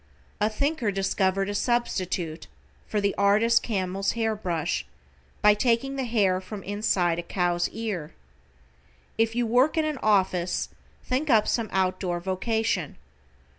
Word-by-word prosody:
A 210 - +2
thinker 280 +1 -1
discovered 195 0 0
a 205 - -2
substitute 185 -8 -1 0.4
for 210 - -1
the 200 -1 +1
artist 215 +4 +4
camel's 195 -2 -1
hair 225 -1 0
brush 170 - -2 0.6
by 210 0 +7
taking 240 +5 +1
the 265 -1 -2
hair 200 -6 +2
from 195 +1 -8
inside 190 -4 0
a - - -1
cow's 175 0 0
ear. 205 -9 -4 1.1
If 225 0 +2
you 240 0 +1
work 250 +8 +3
in 315 - +2
an 305 -3 -2
office 185 -4 +1 0.3
think 270 +4 -1
up 220 -4 +4
some 230 -3 0
out 185 -1 +1
door 175 -2 -2
vocation. 190 - -1
205 Hz, 140 wpm, -26 LUFS, 185-230 Hz, 1.1 s, by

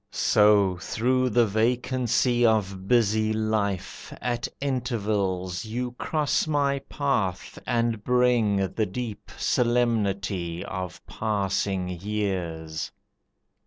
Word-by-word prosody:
So 105 -3 +4
through 130 +8 0
the 120 +1 +4
vacancy 120 +2 +1
of 100 -4 +1
busy 110 -2 +3
life 110 -3 -2
At 120 -1 -2
intervals 105 -9 -1
you 120 +3 -3
cross 150 +3 0
my 140 -2 +1
path 135 -11 -2
and 115 -3 0
bring 115 -6 +2
The 110 -2 0
deep 110 +2 -6
solemnity 100 -8 0
of 95 -2 -6
passing 100 -3 -1
years. 85 -6 -3
110 Hz, 90 wpm, -26 LUFS, 95-120 Hz, -, So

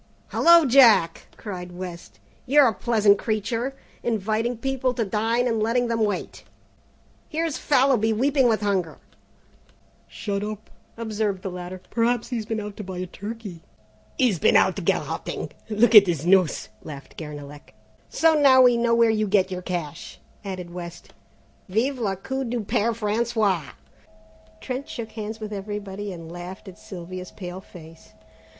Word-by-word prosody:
"Hello, 340 -1 +6
Jack!" 235 -10 +5
cried 180 -4 -7
West, 175 -1 -8 0.3
"you're 285 +1 +6
a 225 - +1
pleasant 210 -2 +3
creature, 230 +4 -2 0.3
inviting 225 +2 -1
people 260 0 -1
to 230 - 0
dine 225 +5 0
and 225 -2 0
letting 235 +2 +1
them 230 -1 +1
wait. 205 -1 -3 0.9
Here's 325 -1 -2
Fallowby 255 -5 +3
weeping 265 +4 +2
with 220 -2 +1
hunger 190 -5 -1 0.6
" - - -34
"Shut 200 -1 -4
up," 215 0 -7 0.3
observed 215 -4 -2
the 190 - -4
latter, 180 +1 -7
"perhaps 235 0 +1
he's 230 -4 -3
been 225 -1 -2
out 210 -1 -7
to 210 - -5
buy 190 -1 -7
a 180 - -3
turkey." 200 -1 -8 0.6
"He's 235 -10 +2
been - - +4
out - - +3
garroting, - - -2 0.2
look 225 +3 +3
at 205 -3 +10
his 165 -3 -1
noose!" 180 -4 +3
laughed 140 -2 -10
Guernalec. 145 -4 -9 0.3
"So 325 - +3
now 280 -4 +6
we 245 -1 +5
know 235 0 +2
where 230 -1 +4
you 215 -1 0
get 190 -1 +2
your 180 0 -4
cash!" 170 -4 -5 0.2
added 185 -3 -6
West; 175 -1 -9 0.6
"vive 250 +7 0
le 200 -4 -1
coup 265 +8 -4
du 240 -1 -2
Père 220 +2 0
François!" 210 -6 0 0.9
Trent 265 +3 -5
shook 225 -2 -6
hands 220 0 -6
with 215 -1 -6
everybody 205 0 -5
and 165 -2 -9
laughed 175 +4 -9
at 190 - -11
Sylvia's 185 0 -8
pale 180 -1 -8
face. 165 -3 -15
215 Hz, 155 wpm, -24 LUFS, 185-235 Hz, 0.9 s, at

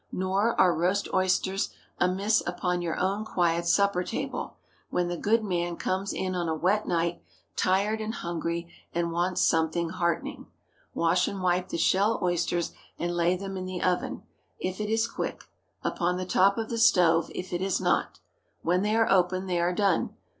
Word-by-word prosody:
Nor 195 +5 0
are 180 -2 +5
roast 180 +5 +1
oysters 190 +1 +1 0.3
amiss 195 +4 +2
upon 180 0 -1
your 170 -2 -2
own 195 +3 0
quiet 170 -4 0
supper 200 0 +3
table, - - -4 0.3
when 175 -1 0
the 175 - -2
"good 220 +5 +2
man" 175 -3 -1
comes 190 +2 -1
in 185 0 -2
on 175 -2 -1
a 160 - 0
wet 195 +7 +1
night, 170 0 0 0.3
tired 200 +4 +1
and 220 +2 -3
hungry, 170 -1 -3 0.3
and 170 0 0
wants 175 +2 0
"something 165 +1 +2
heartening." 170 -2 -2 0.5
Wash 170 +2 +2
and 200 - -4
wipe 180 0 +1
the - - -2
shell 200 +6 +2
oysters, 175 -1 0 0.3
and 175 0 -2
lay 175 +1 +2
them 195 +1 -6
in 185 -1 -4
the 185 -1 -4
oven, 180 -1 -1 0.3
if 185 +2 -3
it 210 - -2
is 225 +1 +2
quick; - - -4 0.4
upon 180 0 0
the 185 - -3
top 195 +3 +3
of 225 -1 -3
the 230 - -1
stove, 170 -6 +4
if 180 0 -5
it 175 - -1
is 190 -1 0
not. - - 0 0.4
When 180 +2 +2
they 210 +2 +1
open, 185 -4 +3
they 180 -2 0
are 175 +1 +2
done. 195 -1 +1
180 Hz, 175 wpm, -27 LUFS, 175-195 Hz, 0.5 s, are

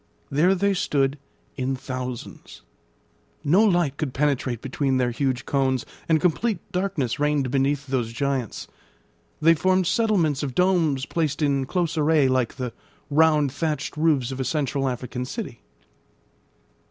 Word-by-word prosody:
There 170 +7 +3
they 200 +2 +2
stood 145 -7 0 0.4
in 135 0 -1
thousands. 130 -2 -7 0.8
No 180 +9 +4
light 175 -9 +2
could 140 -4 -3
penetrate 130 -4 0
between 135 +1 -1
their 125 -1 +1
huge 130 +1 -1
cones, 130 -2 0 0.2
and 160 -1 +4
complete 185 +6 +1
darkness 180 - -1
reigned 145 -3 +1
beneath 140 +1 +1
those 130 -4 -1
giants; 135 -2 -2 0.7
they 165 +2 +6
formed 185 +3 +2
settlements 180 - +1
of 135 -4 -4
domes 170 -7 +2
placed 160 -2 -1
in 140 -2 +1
close 170 -2 -1
array 150 -2 +4
like 130 -3 0
the 125 -3 -4 0.4
round, 150 -2 +4
thatched 155 +2 -2
roofs 150 -5 +2
of 130 - -5
a - - 0
central 135 0 -1
African 125 0 -4
city. 125 - -6
140 Hz, 140 wpm, -24 LUFS, 130-160 Hz, 0.8 s, they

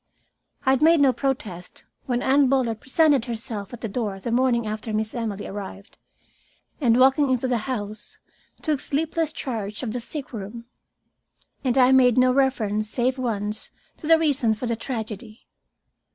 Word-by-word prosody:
I 265 - +5
had 265 +1 +2
made 325 +1 +6
no 275 -2 +5
protest 215 -11 -4 0.2
when 245 -1 0
Anne 275 0 +4
Bullard 245 -5 +1
presented 280 -2 +3
herself 225 -4 -5
at 240 - -9
the 225 - -2
door 205 -2 -3
the 230 +5 -4
morning 240 -1 +2
after 215 +1 -4
Miss 215 0 -1
Emily 215 -4 -4
arrived, 195 0 -8 0.8
and, 245 -4 +3
walking 270 +2 +5
into 255 0 +1
the 245 -2 +1
house, 215 -4 -5 0.5
took 300 -3 +1
sleepless 320 +3 -1
charge 220 -7 -4
of 230 - -2
the 245 - -2
sickroom. 235 -4 -6 1.0
And 260 -1 +1
I 255 0 +6
made 255 -2 +5
no 255 0 +5
reference 215 -6 +1
save 255 +3 0
once 215 -3 -2 0.3
to 300 - -8
the 325 0 +7
reason 280 -8 +2
for 215 - -5
the 230 -1 0
tragedy. 220 -3 -6
245 Hz, 160 wpm, -24 LUFS, 215-265 Hz, 1.0 s, the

